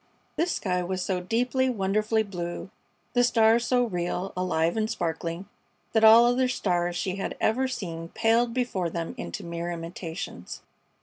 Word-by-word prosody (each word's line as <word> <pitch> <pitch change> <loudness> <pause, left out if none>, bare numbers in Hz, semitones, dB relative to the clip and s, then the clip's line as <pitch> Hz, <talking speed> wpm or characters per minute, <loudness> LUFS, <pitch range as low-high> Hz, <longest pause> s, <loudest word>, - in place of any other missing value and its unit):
This 340 +2 0
sky 180 -2 -1
was 185 +1 -2
so 185 -2 -1
deeply, 250 +6 +1
wonderfully 215 0 +1
blue, 180 -2 -6 0.4
the 245 - +4
stars 230 -1 +4
so 250 -1 +3
real, 180 -3 -2
alive 170 -2 0
and 220 -1 0
sparkling, 170 -1 -3 0.5
that 220 -1 +3
all 225 +2 +9
other 250 +1 +3
stars 175 -7 0
she 180 +2 -2
had 195 - -4
ever 255 +4 +2
seen 165 -9 -5
paled 230 +3 +2
before 230 -8 -1
them 165 0 -4
into 85 - -6
mere 170 0 -4
imitations. 170 0 -6
195 Hz, 150 wpm, -27 LUFS, 175-235 Hz, 0.5 s, all